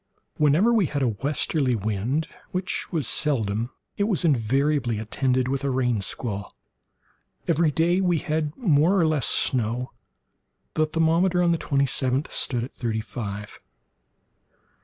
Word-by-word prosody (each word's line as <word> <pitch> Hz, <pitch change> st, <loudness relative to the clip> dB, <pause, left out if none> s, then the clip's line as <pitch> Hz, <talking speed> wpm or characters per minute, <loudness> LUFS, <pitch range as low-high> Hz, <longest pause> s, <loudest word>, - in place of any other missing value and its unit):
Whenever 155 Hz, +11 st, +4 dB
we 210 Hz, -7 st, +3 dB
had 140 Hz, -1 st, -2 dB
a 125 Hz, -, +2 dB
westerly 135 Hz, +3 st, 0 dB
wind, 110 Hz, +8 st, -1 dB, 0.2 s
which 185 Hz, +1 st, -2 dB
was 155 Hz, -9 st, -1 dB
seldom, 115 Hz, -6 st, 0 dB, 0.3 s
it 200 Hz, -, +1 dB
was 195 Hz, -5 st, 0 dB
invariably 135 Hz, -2 st, +1 dB
attended 125 Hz, +4 st, 0 dB
with 135 Hz, +1 st, -2 dB
a 140 Hz, -, 0 dB
rain 125 Hz, -5 st, 0 dB
squall. 100 Hz, 0 st, -3 dB, 0.9 s
Every 165 Hz, -1 st, +3 dB
day 170 Hz, +5 st, +1 dB
we 180 Hz, -3 st, +2 dB
had 155 Hz, -1 st, -2 dB
more 175 Hz, -, +3 dB
or 170 Hz, -, +3 dB
less 155 Hz, -4 st, +1 dB
snow. 120 Hz, 0 st, +1 dB, 0.8 s
The 155 Hz, 0 st, +1 dB
thermometer, 170 Hz, +3 st, +2 dB
on 170 Hz, -, +3 dB
the 165 Hz, -, 0 dB
twenty 140 Hz, -1 st, +1 dB
seventh 130 Hz, +1 st, -1 dB
stood 120 Hz, -3 st, 0 dB
at 125 Hz, -, -8 dB
thirty 115 Hz, -3 st, -2 dB
five. 105 Hz, -1 st, -7 dB
140 Hz, 140 wpm, -24 LUFS, 120-160 Hz, 0.9 s, Whenever